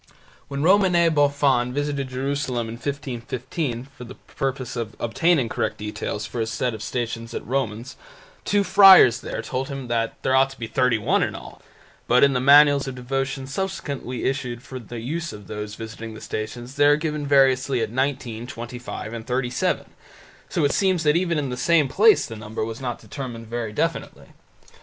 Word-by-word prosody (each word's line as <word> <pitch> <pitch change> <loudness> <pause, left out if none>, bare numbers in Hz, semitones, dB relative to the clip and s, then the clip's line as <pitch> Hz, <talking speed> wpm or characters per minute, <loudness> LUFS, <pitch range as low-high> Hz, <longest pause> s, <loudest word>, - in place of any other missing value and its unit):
When 140 0 -3
Romanet 180 -2 +4
Boffin 140 -4 +2
visited 145 -2 -2
Jerusalem 130 -2 -2
in 110 - -6
1515 125 0 -4
for - - -9
the 125 +2 -10
purpose 130 -3 -4
of 115 -3 -4
obtaining 140 +3 +2
correct - - -2
details 105 0 -4
for 115 - -6
his 110 -1 -1
set 125 +1 -1
of 110 - -7
Stations 115 0 -4
at - - -5
Romans, 125 -2 -3 0.5
two 205 0 +2
friars 190 - +8
there - - -5
told 130 +1 -3
him 135 -3 -6
that 115 -1 -1
there 130 - +2
ought 135 +1 +4
to 135 - -12
be 115 - -3
thirty 125 +1 +2
one 105 - +1
in - - -1
all, - - -11 0.5
but 125 +2 +5
in 140 -1 +5
the 125 - +1
manuals 140 +1 +6
of 135 - -5
devotion 135 +1 -3
subsequently 140 -5 -4
issued 125 -3 -2
for 130 - -8
the 120 0 -8
use 165 +7 -3
of 105 -1 -11
those 105 0 -6
visiting 110 0 -8
these 110 - -10
Stations 120 +5 -6
they 145 0 +5
are 145 - +6
given 150 -1 -3
variously 135 -2 +3
as 110 - -1
nineteen, 125 -3 -2
twenty 120 0 -7
five, 115 -2 -7
and 115 -1 -7
thirty 125 -1 -1
seven, 125 - 0 0.6
so - - +1
it 140 - +2
seems 185 -4 +2
that 150 0 +3
even 170 -2 +1
in 140 -3 -2
the - - -2
same 150 +3 +3
place 430 - +5
the 115 - -8
number 110 0 -4
was 115 +2 -7
not 125 -2 -3
determined 115 +1 -7
very 115 -1 -4
definitely. 105 - -3
130 Hz, 190 wpm, -23 LUFS, 115-140 Hz, 0.6 s, friars